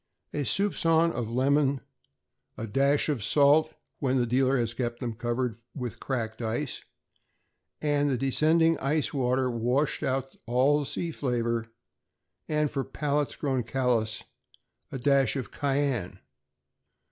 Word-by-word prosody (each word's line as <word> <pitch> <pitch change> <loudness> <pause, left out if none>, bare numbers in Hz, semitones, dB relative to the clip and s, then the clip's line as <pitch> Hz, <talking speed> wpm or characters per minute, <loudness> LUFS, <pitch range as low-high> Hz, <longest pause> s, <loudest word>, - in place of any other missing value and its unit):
A 145 -1 -1
suspicion 165 -2 +2
of 120 -6 -3
lemon; 135 +3 +2 0.8
a 110 - -4
dash 140 +6 +2
of 140 -9 -1
salt 145 +6 +4 0.3
when 135 -2 +1
the 125 - +2
dealer 130 +3 +2
has 115 -2 -1
kept 120 0 -3
them 120 -2 -3
covered 120 +1 -2 0.2
with 125 -6 -5
cracked 115 -4 -3
ice, 120 +5 -3 1.0
and 145 -1 +2
the 130 - +1
descending 160 +5 +3
ice 150 +3 0
water 130 -1 +1
washed 125 +5 0
out 135 0 -2
all 140 +5 +3
sea 170 +4 -3
flavor; 120 -5 -1 0.8
and, 150 -1 +1
for 135 -2 -1
palates 145 +1 -1
grown 135 -4 -1
callous, 120 -3 0 0.7
a - - -4
dash 135 +1 +3
of 130 -6 -4
cayenne. 135 -8 -1
135 Hz, 130 wpm, -28 LUFS, 120-145 Hz, 1.0 s, salt